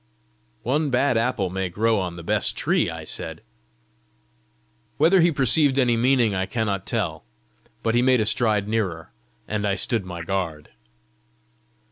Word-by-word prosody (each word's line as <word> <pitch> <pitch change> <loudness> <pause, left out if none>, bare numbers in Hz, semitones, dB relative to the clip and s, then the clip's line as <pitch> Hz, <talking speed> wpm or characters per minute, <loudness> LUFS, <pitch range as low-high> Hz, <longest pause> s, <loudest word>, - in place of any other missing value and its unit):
"One 145 +5 0
bad 130 0 +2
apple 115 -5 0
may 95 0 -2
grow 110 +4 +1
on 90 -2 -4
the 85 - -9
best - - -1
tree," - - +1
I - - -7
said. - - -6 1.5
Whether 170 +5 +4
he 170 +1 +4
perceived 140 0 +3
my 130 - +4
meaning 120 -2 +2
I 95 0 -1
cannot 105 -5 -2
tell, 90 -10 -2 0.6
but 115 - +1
he 120 - +3
made 130 0 +3
a 110 - +1
stride 110 -2 +2
nearer, 95 -7 -2 0.4
and 105 -1 -2
I 100 - +1
stood 115 +3 0
on 95 - -13
my 85 -2 -6
guard. 80 -4 -4
110 Hz, 155 wpm, -23 LUFS, 95-125 Hz, 1.5 s, Whether